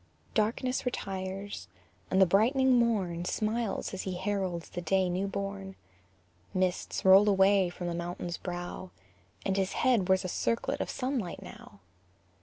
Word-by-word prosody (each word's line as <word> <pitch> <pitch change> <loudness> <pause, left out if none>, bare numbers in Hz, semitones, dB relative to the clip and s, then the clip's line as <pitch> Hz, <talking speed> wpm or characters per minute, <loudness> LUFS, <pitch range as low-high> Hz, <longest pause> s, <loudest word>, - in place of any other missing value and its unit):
_ - - -29
Darkness 240 +4 0
retires, 195 -4 -4 0.4
and 190 - +2
the 190 - +8
brightening 255 +8 +4
morn 190 -8 +1
Smiles 215 +3 -1
as 190 - -3
he 185 -2 -4
heralds 185 -3 -2
the 175 - -4
day 185 +2 +2
new 190 +3 -1
born. 195 -1 -5 0.8
Mists 185 0 -1
roll 195 +2 +8
away 195 -1 +4
from 175 0 -7
the 175 - -2
mountain's 175 0 -4
brow, 175 +1 -5 0.6
And 195 - +1
his 190 -1 0
head 230 -8 +2
wears 190 0 +3
a - - 0
circlet 230 +5 -1
of - - -3
sunlight 250 -9 -3
now. 100 - -13
190 Hz, 150 wpm, -30 LUFS, 180-210 Hz, 0.8 s, the